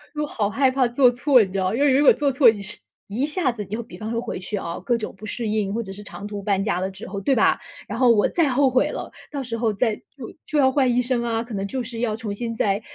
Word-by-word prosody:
我 300 - -1
好 210 -8 -1
害 265 +3 +2
怕 260 -2 +2
做 245 +1 +4
错， 250 +1 +4
你 190 - -6
知 195 - -3
道， 185 +3 0
因 270 - -1
为 290 - +5
如 275 +3 +4
果 - - +8
做 285 -2 0
错 260 -1 +5
是 210 +3 -2 0.3
一 230 +7 -1
下 300 -3 0
子 210 -3 -6
就 215 +5 -4
比 235 - -12
方 220 0 -5
说 230 0 -1
回 - - -5
去 195 +3 -5
啊， 170 -4 -4
各 235 +6 0
种 215 - -5
不 215 - -10
适 230 +2 -4
应， 210 -2 -1
或 230 - -2
者 195 - -8
是 200 +2 -8
长 200 - -9
途 205 -1 -5
搬 195 -1 0
家 200 -4 0
的 190 - -2
之 190 +1 -10
后， 200 +1 -5
对 260 +7 +1
吧？ - - +3 0.3
然 225 +4 -5
后 250 -2 +5
我 210 -3 +5
再 335 -3 +2
后 265 +1 +3
悔 255 0 +2
了， - - -6 0.2
到 280 -2 -4
时 230 -2 -4
候 225 -2 0
再 220 +2 +1
就 265 -5 -12
就 305 - -1
要 265 -2 +5
换 265 -2 +2
医 250 - +3
生 245 -1 0
啊， 230 -1 -1
可 235 -2 -10
能 195 0 -2
就 260 +3 -3
是 230 -1 -7
要 225 -3 0
重 220 -3 -5
新 230 +2 -4
再 200 -1 +1
230 Hz, 320 characters per minute, -23 LUFS, 205-255 Hz, 0.3 s, 果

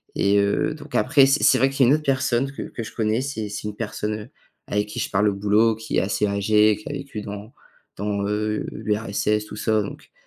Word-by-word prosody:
Et, 100 +1 +3
heu, 100 +9 +1
donc, 150 -2 -13
après 135 +2 +5
c'est 135 - +2
c'est 140 -2 +6
vrai 135 +2 +4
qu'il 135 -1 +3
y - - +4
a - - +5
une - - +6
autre 155 - -4
personne 130 -1 +1
que 140 - -6
que 115 - -6
je 110 - -9
connais, 110 +1 0
c'est 130 -6 -4
c'est 105 - -6
une 105 - -5
personne, 105 -1 -3
heu, 105 - -10 0.4
avec 105 0 -1
qui - - -5
je - - -2
parle 105 +1 +3
au - - -1
boulot, 105 +3 +3
qui 110 0 -3
est - - +4
assez 105 +2 0
âgée, 105 +1 +3
qui 105 +7 -9
a - - -4
vécu 140 -6 -6
dans 105 +2 -8 0.4
dans, 100 0 -2
heu, 105 +1 -1
l'URSS, 105 0 -1
tout - - -9
ça, 110 -1 +1
donc, 100 - -10
110 Hz, 245 wpm, -23 LUFS, 105-130 Hz, 0.4 s, c'est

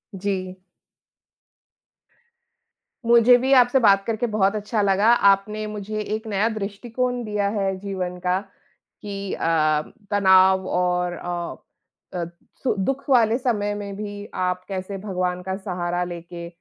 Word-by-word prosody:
जी। 185 -1 -3 2.5
मुझे 235 +1 +7
भी 260 +2 -1
आपसे 250 0 +5
बात 200 -4 +5
करके 230 +1 -1
बहुत 210 -2 +1
अच्छा 210 +1 -1
लगा, 200 +2 +3
आपने 210 -1 +3
मुझे 210 0 -5
एक 215 +2 -4
नया 210 +1 +1
दृष्टिकोण 230 +4 -3
दिया 210 -2 -1
है 195 -2 -1
जीवन 185 -2 -4
का, 180 +1 +1 0.6
कि 200 -1 -5
अ, 155 -2 +2 0.3
तनाव 190 -1 +5
और 180 -1 0
अ 175 0 -4 0.6
अ, 175 -2 -2 0.4
सु 260 - +2
दुःख 270 +1 -1
वाले 235 -3 +4
समय 210 -5 -1
में 200 -1 -6
भी 205 0 -6
आप 180 0 -1
कैसे 195 0 -5
भगवान 180 -2 -2
का 190 +1 -3
सहारा 180 -2 -2
लेके 170 0 -7
200 Hz, 130 wpm, -23 LUFS, 185-215 Hz, 2.5 s, मुझे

